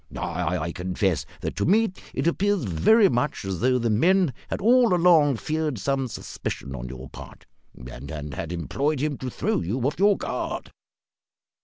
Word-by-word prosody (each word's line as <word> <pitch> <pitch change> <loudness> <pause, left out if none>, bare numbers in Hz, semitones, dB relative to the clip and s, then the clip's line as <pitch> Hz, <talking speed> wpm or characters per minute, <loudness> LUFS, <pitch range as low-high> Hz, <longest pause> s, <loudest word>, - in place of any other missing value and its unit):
I 80 +3 -2
confess 90 0 -1
that, - - -4
to - - 0
me, 220 +3 +3 0.2
it - - -1
appears 195 +1 +1
very 120 - +4
much 125 - -1
as 95 -3 -3
though 130 +1 +3
the 120 -2 0
men 175 - +3
had - - -3
all 235 -1 +4
along 165 -6 +5
feared 155 +2 -2
some 135 +6 -1
suspicion 70 - -6
on 65 -1 -6
your 65 +1 -8
part, - - -12 0.3
and 60 +2 -9 0.2
had 85 0 -5
employed 135 - -1
him 145 -1 -2
to 130 - -4
throw - - -1
you 95 +10 -2
off 140 +7 -1
your 200 +1 +4
guard." - - -4
130 Hz, 165 wpm, -25 LUFS, -, 0.3 s, along